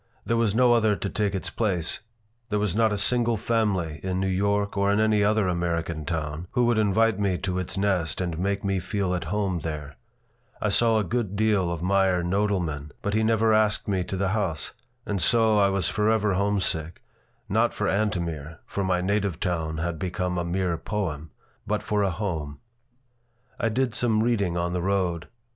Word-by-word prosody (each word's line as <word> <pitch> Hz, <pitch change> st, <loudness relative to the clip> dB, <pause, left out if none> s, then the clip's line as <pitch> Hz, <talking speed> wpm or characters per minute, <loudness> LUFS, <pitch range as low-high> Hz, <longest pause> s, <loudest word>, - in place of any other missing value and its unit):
There 115 Hz, -, +1 dB
was 115 Hz, -3 st, +1 dB
no 125 Hz, 0 st, +5 dB
other 110 Hz, -3 st, +3 dB
to 100 Hz, -, -3 dB
take 105 Hz, -2 st, 0 dB
its 95 Hz, -, -3 dB
place. 90 Hz, -7 st, 0 dB, 0.5 s
There 105 Hz, -, 0 dB
was 105 Hz, -1 st, 0 dB
not 110 Hz, 0 st, +3 dB
a 105 Hz, -, 0 dB
single 120 Hz, +2 st, +2 dB
family 100 Hz, -8 st, 0 dB
in 95 Hz, -1 st, -2 dB
New 95 Hz, -, 0 dB
York 100 Hz, +2 st, 0 dB
or 100 Hz, 0 st, +2 dB
in 100 Hz, -, +2 dB
any 110 Hz, -1 st, +3 dB
other 105 Hz, -1 st, +2 dB
American 85 Hz, -3 st, -2 dB
town 80 Hz, 0 st, -3 dB
who 125 Hz, -, +3 dB
would 120 Hz, -2 st, +2 dB
invite 110 Hz, 0 st, +2 dB
me 100 Hz, -3 st, +1 dB
to 95 Hz, -1 st, -2 dB
its 95 Hz, +2 st, -4 dB
nest 95 Hz, -5 st, 0 dB
and 85 Hz, -3 st, -2 dB
make 100 Hz, +2 st, -1 dB
me 100 Hz, -1 st, 0 dB
feel 95 Hz, +1 st, -2 dB
at 85 Hz, -2 st, -2 dB
home 95 Hz, 0 st, -1 dB
there. 75 Hz, -3 st, -6 dB, 0.6 s
I -, -, 0 dB
saw 115 Hz, -2 st, +3 dB
a 110 Hz, -, +2 dB
good 105 Hz, 0 st, -2 dB
deal 100 Hz, -4 st, +2 dB
of 85 Hz, -1 st, -4 dB
Meyer 95 Hz, -1 st, +2 dB
Nodelman, 90 Hz, -6 st, -1 dB
but 100 Hz, -, -1 dB
he 110 Hz, -, +2 dB
never 110 Hz, 0 st, +3 dB
asked 110 Hz, -1 st, +2 dB
me 95 Hz, -3 st, 0 dB
to 95 Hz, -, -4 dB
the 95 Hz, 0 st, 0 dB
house. 95 Hz, -8 st, -2 dB, 0.3 s
And 100 Hz, -3 st, -2 dB
so 110 Hz, +3 st, +4 dB
I 100 Hz, -1 st, +4 dB
was 95 Hz, -3 st, 0 dB
forever 105 Hz, -1 st, +2 dB
homesick, 95 Hz, -4 st, 0 dB, 0.5 s
not -, -, +2 dB
for -, -, -2 dB
Antomir 85 Hz, -7 st, -1 dB
for 100 Hz, -, -3 dB
my 90 Hz, -1 st, +1 dB
native 100 Hz, -2 st, 0 dB
town 80 Hz, -4 st, -2 dB
had 80 Hz, 0 st, -3 dB
become 90 Hz, 0 st, -2 dB
a -, -, -1 dB
mere 90 Hz, 0 st, -1 dB
poem 80 Hz, -8 st, -3 dB, 0.4 s
but -, -, -1 dB
for 105 Hz, -1 st, 0 dB
a 100 Hz, -, +2 dB
home 80 Hz, -7 st, -3 dB, 1.0 s
I 115 Hz, -, +1 dB
did 125 Hz, +1 st, 0 dB
some 110 Hz, -3 st, +1 dB
reading 100 Hz, -7 st, +1 dB
on 85 Hz, 0 st, -1 dB
the 90 Hz, -, -1 dB
road. 90 Hz, -3 st, 0 dB
95 Hz, 195 wpm, -26 LUFS, 85-105 Hz, 1.0 s, no